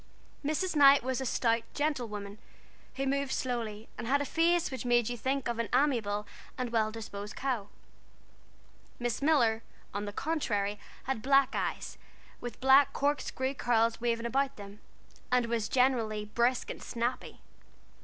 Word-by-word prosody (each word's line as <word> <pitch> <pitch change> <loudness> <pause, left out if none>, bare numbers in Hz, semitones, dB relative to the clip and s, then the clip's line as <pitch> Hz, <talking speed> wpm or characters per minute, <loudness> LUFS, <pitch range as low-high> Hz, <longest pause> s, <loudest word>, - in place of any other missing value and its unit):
Mrs. 310 +5 -1
Knight 280 -2 +7
was 260 +1 -1
a 265 - -2
stout, 230 0 +2
gentle 290 -5 0
woman, 205 -1 -7 0.6
who 270 - -1
moved 275 0 0
slowly, 230 -5 -3
and - - -4
had 280 +3 +3
a 285 - -1
face 335 +2 +2
which 260 - -4
made 240 -2 +3
you 245 - -2
think 265 +3 -1
of 235 -1 -2
an 230 - -1
amiable 230 -7 +1 0.3
and 250 -2 -3
well 220 -2 +2
disposed 205 -2 -7
cow. 245 -7 -2 1.3
Miss 240 +1 -2
Miller, 245 -7 +3 0.3
on 205 +1 -3
the 205 - -4
contrary, 210 -8 -1 0.2
had 265 -4 -2
black 275 +1 +4
eyes, - - -3 0.4
with 240 -1 -7
black 265 +2 +6
corkscrew 275 -2 -1
curls 230 -3 +1
waving 235 -1 0
about 275 +3 0
them, 200 0 -10 0.5
and 250 -1 +3
was 230 -2 -1
generally 230 -5 +2
brisk 235 +4 0
and - - -8
snappy. 240 +1 -3
245 Hz, 155 wpm, -31 LUFS, 225-275 Hz, 1.3 s, Knight